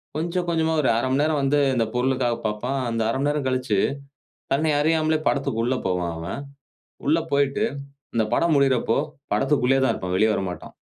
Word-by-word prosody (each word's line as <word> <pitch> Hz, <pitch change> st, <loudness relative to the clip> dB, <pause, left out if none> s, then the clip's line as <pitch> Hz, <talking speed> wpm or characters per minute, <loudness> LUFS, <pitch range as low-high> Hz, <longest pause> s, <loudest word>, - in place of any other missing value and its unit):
கொஞ்சம், 175 Hz, +3 st, -2 dB
கொஞ்சமா 160 Hz, -1 st, +1 dB
ஒரு 130 Hz, -, +2 dB
1/2 120 Hz, -, 0 dB
மணி 135 Hz, +2 st, +2 dB
நேரம் 155 Hz, -2 st, +1 dB
வந்து 140 Hz, +2 st, +2 dB, 0.2 s
இந்த 115 Hz, -2 st, +2 dB
பொருளுக்காக 125 Hz, -1 st, +1 dB
பார்ப்பான். 120 Hz, +6 st, -2 dB
அந்த 115 Hz, -1 st, -1 dB
1/2 130 Hz, -, 0 dB
மணி 145 Hz, +1 st, +1 dB
நேரம் 145 Hz, -2 st, -1 dB
கழிச்சு, 130 Hz, -6 st, 0 dB, 0.7 s
தன்னை 155 Hz, +2 st, +2 dB
அறியாமலே 155 Hz, 0 st, +2 dB
படத்திற்கு 135 Hz, -5 st, -1 dB
உள்ள 130 Hz, +1 st, 0 dB
போவான் 90 Hz, -2 st, -1 dB
அவன். 85 Hz, +11 st, -5 dB, 0.7 s
உள்ள 160 Hz, +3 st, +4 dB
போயிட்டு 140 Hz, +7 st, +2 dB, 0.5 s
இந்த 110 Hz, -, +3 dB
படம் 170 Hz, -2 st, +2 dB
முடியுறப்போ 130 Hz, -4 st, +2 dB, 0.4 s
படத்திற்குள்ளேயே 135 Hz, -1 st, +2 dB
தான் -, -, +3 dB
இருப்பான். 90 Hz, 0 st, -4 dB
வெளிய 110 Hz, +2 st, +4 dB
வரமாட்டான். 90 Hz, -4 st, -4 dB
135 Hz, 170 wpm, -23 LUFS, 115-150 Hz, 0.7 s, உள்ள